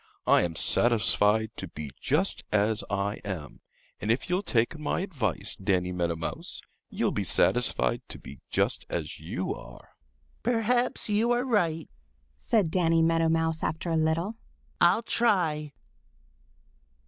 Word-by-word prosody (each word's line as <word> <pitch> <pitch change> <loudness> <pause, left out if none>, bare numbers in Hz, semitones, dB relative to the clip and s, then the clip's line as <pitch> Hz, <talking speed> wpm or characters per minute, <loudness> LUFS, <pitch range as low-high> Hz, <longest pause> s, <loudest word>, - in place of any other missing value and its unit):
I - - +5
am 85 -2 -2
satisfied 110 0 +3
to 95 - -5
be 75 -3 -8
just 160 +8 +1
as 105 +1 +2
I 100 +1 -1
am, 90 -8 -6 0.4
and 105 - -4
if 125 +10 0
you'll 180 +2 +2
take 120 - 0
my 150 - -1
advice, 135 - -2
Danny 95 -2 0
Meadow 85 -2 -1
Mouse, 80 0 -5 0.3
you'll - - 0
be - - -1
satisfied 125 -1 +2
to - - -5
be 70 - -12
just - - +1
as - - -4
you - - -3
are." - - -12 0.5
"Perhaps 240 +1 +1
you 215 +3 +2
are 240 +1 +1
right," 170 -10 +1 0.5
said 200 - +1
Danny 165 -2 +3
Meadow 165 0 +3
Mouse 160 0 0
after 165 +2 -2
a - - +1
little. 165 +7 0 0.4
"I'll 180 +7 +5
try." 170 -11 +1
160 Hz, 140 wpm, -28 LUFS, -, 0.5 s, I